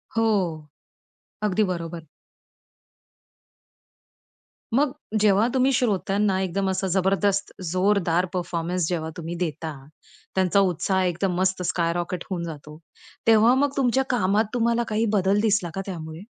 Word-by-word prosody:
हो. 225 0 +2 1.2
अगदी 210 0 +2
बरोबर. 165 -2 -6 2.7
मग 275 +1 +3 0.3
जेव्हा 210 +2 +4
तुम्ही 260 +1 +3
श्रोत्यांना 200 -4 +1
एकदम 190 +1 -1
असं 190 0 -1
जबरदस्त, 195 +1 +1 0.2
जोरदार 185 -2 +2
परफॉर्मन्स 175 -1 -2
जेव्हा 160 -3 -2
तुम्ही 170 +1 -5
देता, 160 -2 -3 0.6
त्यांचा 190 +1 +3
उत्साह 190 0 +1
एकदम 180 +1 0
मस्त 190 0 +1
स्काय 170 -1 0
रॉकेट 175 0 -3
होऊन 175 -3 -3
जातो, 150 -2 -8 0.5
तेव्हा 225 +2 +6
मग 280 +1 0
तुमच्या 265 0 +2
कामात 215 -2 +2
तुम्हाला 235 0 +1
काही 220 +1 0
बदल 195 +1 +2
दिसला 210 -5 +1
का 195 - -2
त्यामुळे? 160 -3 -7
190 Hz, 120 wpm, -24 LUFS, 175-210 Hz, 2.7 s, तेव्हा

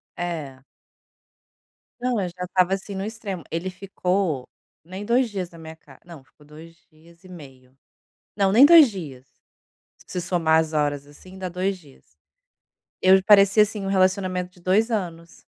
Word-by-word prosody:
É. 155 -7 -5 1.4
Não, 245 -2 -1
eu 180 - -3
já 180 +1 -8
estava 185 +1 +1
assim 195 +1 -5
no 190 - -4
extremo. 210 -5 -6
Ele 170 +3 -3
ficou 185 -6 -2 0.4
nem 190 +4 -8
2 240 +2 +1
dias 190 -4 -5
na 170 - -16
minha 160 0 -10
ca 160 - -19
não, 170 -5 -13
ficou 150 +2 -24
2 160 +3 -14 0.2
dias 165 +3 -22
e - - -14
meio. 135 -6 -14 0.6
Não, 195 -2 +2
nem 240 +7 +7
2 315 -5 +7
dias. 145 -10 -9 0.8
Se 180 - -4
somar 165 -2 +2
as 160 -1 -5
horas, 145 -2 -1
assim, 185 +6 -15
dá 185 -1 -5
2 185 +2 -2
dias. 145 -7 -20 1.0
Eu 190 +1 +5
parecia 200 +1 +6
assim, 210 -2 -5
um - - -3
relacionamento 185 -1 0
de 180 - -22
2 205 +6 +1
anos. 170 -6 -5
180 Hz, 160 wpm, -23 LUFS, 160-195 Hz, 1.4 s, nem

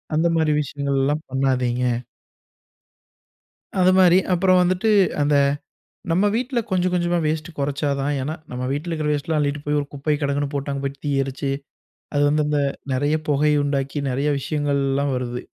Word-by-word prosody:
அந்த 165 +2 +3
மாரி 155 -1 +2
விஷயங்கள்லாம் 140 +1 -1
பண்ணாதீங்க. 125 -2 +1 2.0
அது 185 +1 +5
மாரி. 185 -1 +6
அப்பறம் 185 +1 +4
வந்துட்டு, 185 +5 +1 0.3
அந்த 145 0 +2 0.8
நம்ம 185 +5 +3
வீட்டுல 245 +1 -1
கொஞ்சம் 185 0 +1
கொஞ்சமா 175 0 +1
வேஸ்ட்டு 155 +1 -2
கொறைச்சா 140 +1 -1
தான். 140 +2 0
ஏன்னா 150 +4 -3 0.2
நம்ம 125 0 -4
வீட்டுல 155 +5 -3
இருக்கிற 155 -2 -1
வேஸ்ட்டல்லாம் 150 +2 -1
அள்ளிட்டு 145 0 -1
போய் 150 0 +1
ஒரு 145 - -4
குப்பை 145 +2 0
கிடங்குன்னு 140 0 -1
போட்டு, 140 0 -2
அங்க 140 0 -3
போய் 140 0 -4
தீ 145 - 0
எரிச்சு, 135 +1 -3 0.6
அது 145 - +3
வந்து 150 +1 +2
அந்த 150 -1 +1 0.3
நெறைய 145 +4 +1
புகையை 150 +1 +3
உண்டாக்கி, 140 0 -2
நெறைய 140 +4 0
விஷயங்கள்லாம் 140 -1 0
வருது. 125 -1 -3
145 Hz, 155 wpm, -22 LUFS, 140-160 Hz, 2.0 s, மாரி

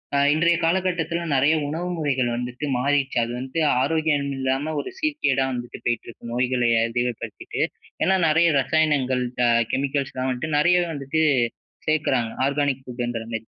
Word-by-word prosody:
அ - - +3 0.2
இன்றைய 170 +2 +3
காலகட்டத்தில 170 -1 0
நிறைய 140 +4 +4
உணவு 170 +4 -3
முறைகள் 135 -5 0
வந்துட்டு 125 +4 -4
மாறிருச்சு. 140 0 +1
அது 120 - -4
வந்து 130 +6 -4 0.2
ஆரோக்கியம் 145 -1 +1
இல்லாம 135 +4 -1
ஒரு - - -7
சீர்கேடா 290 - +1
வந்துட்டு 120 -1 -6
போயிட்டுருக்கு. 120 0 -3
நோய்கள 125 0 +1 0.3
அதிகப்படுத்திட்டு. 120 0 -3 0.4
ஏன்னா, 190 - +3
நெறைய 160 +2 +4
ரசாயனங்கள் 135 -3 +1 0.2
அ - - +4 0.2
கெமிக்கல்ஸ்லாம் 135 -1 -1
வந்துட்டு, 145 +4 -2
நெறையவே 175 +3 +3
வந்துட்டு 140 +3 -1 0.7
சேர்க்குறாங்க. 135 -7 +1 0.2
ஆர்கானிக் 140 -2 0
ஃபுட்டுன்றமாரி. 115 -2 -4
140 Hz, 130 wpm, -23 LUFS, 125-160 Hz, 0.7 s, நிறைய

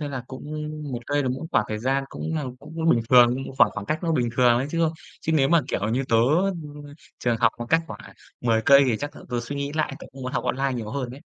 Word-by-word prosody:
Thế 150 - -3
là 130 -3 -5
cũng 130 - -9 0.5
1 120 - -2
cây 145 0 +1
là 130 - -1
cũng 130 +6 -3
khoảng 115 - +3
thời 110 0 -3
gian 135 +4 0
cũng 160 - -5
là 150 - -2
cũng 160 +3 -3
bình 120 - +4
thường, 120 -1 +7 0.2
khoảng - - +6
khoảng 100 - -6
cách 155 - -2
nó 165 -2 0
bình 125 -6 +1
thường 125 -2 +5
ấy 130 - -1
chứ, 165 - -1
ơ. 160 -1 +2 0.3
Chứ 160 - -1
nếu 140 -4 +3
mà, 170 -1 +5
kiểu 105 - -1
như, 125 +4 0
tớ, 115 - +4 0.5
ừm, 145 0 -10 0.4
trường 120 -1 0
học 115 0 +3
mà 120 - -5
cách 165 - +4
khoảng, 105 - -8
à, - - -13 0.3
10 115 -2 +2
cây 140 0 +7
thì 120 -4 +1
chắc 145 +5 -6
là - - -11
tớ 120 -1 -1
suy 140 +4 -5
nghĩ 140 0 -3
lại, 155 -2 -1
tớ - - -10
cũng 135 0 -10
muốn 130 +1 -4
học 130 - -1
online 135 +2 0
nhiều 110 -3 -5
hơn 125 -1 -3
đấy. 135 - -10
135 Hz, 285 wpm, -24 LUFS, 120-145 Hz, 0.5 s, thường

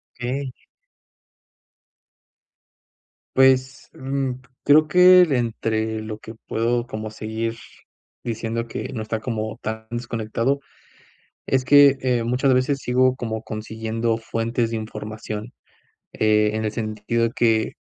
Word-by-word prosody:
Okey. 130 +2 -3 2.8
Pues, 130 0 +3
mm, 135 0 -2 0.3
creo 155 +2 +5
que 180 +2 +7
entre 110 -6 0
lo 110 0 -6
que 110 +1 -10
puedo 120 +1 0
como 110 0 -5
seguir 110 +1 -4 0.7
diciendo 115 0 -3
que - - -5
no 115 - -4
está 110 0 -3
como 110 -1 -4
tan 110 0 -5
desconectado, 120 +2 -1 0.9
es 130 -1 +1
que, 145 0 +7
eh, 125 -2 +1
muchas 125 +3 +2
veces 130 +2 +2
sigo 130 0 +2
como 110 -3 -4
consiguiendo 110 +1 -3
fuentes 115 +1 -2
de 115 - -3
información, 110 +1 -6 0.6
eh, 105 0 +3
en 110 0 -2
el 105 - -1
sentido 110 +1 -1
que 110 -2 +2
115 Hz, 115 wpm, -23 LUFS, 110-130 Hz, 2.8 s, que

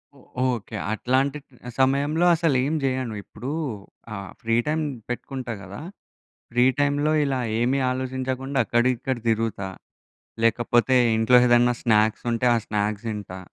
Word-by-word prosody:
ఒ 140 - -18 0.4
ఓకే. 110 +1 -10 0.2
అట్లాంటి 135 +6 0 0.4
సమయంలో 140 +5 +2
అసలేం 150 -3 +1
చేయను. 130 -4 -1
ఇప్పుడు 125 +6 -7 0.6
ఆ - - -4 0.3
ఫ్రీ 115 -1 0
టైమ్ 155 +1 0 0.3
పెట్టుకుంటా 125 -1 -4
గదా! 100 +4 -9 0.7
ఫ్రీ 120 +1 +3
టైమ్‌లో 145 +1 +2
ఇలా 135 -2 -1 0.2
ఏమి 130 +4 +1
ఆలోచించకుండా 130 +1 -3
అక్కడిక్కడ 125 +2 +1
తిరుగుతా. 110 -3 -1 0.8
లేకపోతే 120 +3 +3 0.2
ఇంట్లో 115 +3 +5
ఏదైనా 120 0 +4
స్నాక్స్ 110 -2 +2
ఉంటే 115 +1 0
ఆ - - +2
స్నాక్స్ 105 +1 -2
తింటా. 100 -4 -6
125 Hz, 120 wpm, -24 LUFS, 115-135 Hz, 0.8 s, ఇంట్లో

